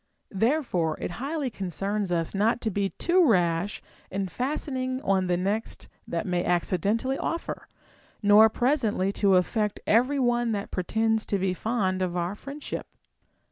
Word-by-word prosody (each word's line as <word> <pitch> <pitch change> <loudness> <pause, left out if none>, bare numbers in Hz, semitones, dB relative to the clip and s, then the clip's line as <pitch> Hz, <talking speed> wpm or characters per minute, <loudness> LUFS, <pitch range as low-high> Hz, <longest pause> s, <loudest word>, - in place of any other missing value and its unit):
Therefore 195 - +1
it - - -4
highly 285 -2 -2
concerns 195 +1 -2
ns 165 -2 0
not 215 +4 +2
to 220 - -1
be 195 0 0
too 355 - +2
rash 180 - +1 0.3
in 195 0 -3
fastening 260 - -2
on 190 -1 +1
the 175 -1 +1
next 200 +5 -2 0.2
that - - -2
may 180 -2 0
accidentally 200 +9 0
offer, 335 +1 -4 0.6
nor 210 +2 +7
pres 260 +6 +1
ently 200 -4 0
to 195 -2 +3
affect 210 +3 +1
every 250 +6 +3
one 240 -3 +1
that 200 -1 -4
pretends 220 +4 0
to 200 - +1
be 190 -1 0
fond 190 -2 -1
of 180 -1 -1
our 175 +2 -1
friendship. 275 +7 -7
210 Hz, 150 wpm, -26 LUFS, 185-245 Hz, 0.6 s, nor